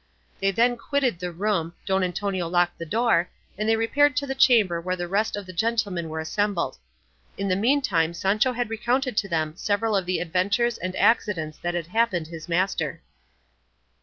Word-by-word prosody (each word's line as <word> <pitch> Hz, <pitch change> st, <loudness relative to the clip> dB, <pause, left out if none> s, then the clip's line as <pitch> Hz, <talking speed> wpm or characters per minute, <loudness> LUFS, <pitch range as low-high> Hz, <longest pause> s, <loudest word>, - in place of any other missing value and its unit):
They 195 Hz, -, +2 dB
then 240 Hz, +5 st, +2 dB
quitted 255 Hz, -5 st, 0 dB
the 180 Hz, 0 st, -4 dB
room, 175 Hz, -2 st, -1 dB
Don 190 Hz, -1 st, +1 dB
Antonio 185 Hz, 0 st, -2 dB
locked 175 Hz, 0 st, +1 dB
the 170 Hz, -, -6 dB
door, 225 Hz, -3 st, +2 dB, 0.3 s
and 215 Hz, +3 st, -1 dB
they 225 Hz, -, +4 dB
repaired 255 Hz, +5 st, +2 dB
to 280 Hz, -, +1 dB
the 270 Hz, -, -2 dB
chamber 220 Hz, -10 st, +4 dB
where 185 Hz, +2 st, -2 dB
the 175 Hz, -1 st, -4 dB
rest 205 Hz, +5 st, 0 dB
of 205 Hz, -1 st, -6 dB
the 185 Hz, -, -10 dB
gentlemen 200 Hz, -4 st, -1 dB
were 160 Hz, 0 st, -4 dB
assembled. 185 Hz, -, -1 dB, 0.6 s
In 200 Hz, -, -2 dB
the 185 Hz, -, +2 dB
meantime 195 Hz, -, +1 dB
Sancho 210 Hz, +8 st, +1 dB
had 240 Hz, -2 st, -3 dB
recounted 245 Hz, +3 st, 0 dB
to 200 Hz, -3 st, 0 dB
them 155 Hz, -2 st, -1 dB
several 210 Hz, +3 st, 0 dB
of 190 Hz, -2 st, 0 dB
the 185 Hz, -, +1 dB
adventures 200 Hz, +7 st, 0 dB
and 185 Hz, +1 st, -4 dB
accidents 175 Hz, -9 st, +1 dB
that 175 Hz, 0 st, -2 dB
had 170 Hz, -2 st, -2 dB
happened 185 Hz, -3 st, 0 dB
his 165 Hz, +1 st, -9 dB
master. 170 Hz, -4 st, -1 dB
195 Hz, 185 wpm, -25 LUFS, 175-225 Hz, 0.6 s, they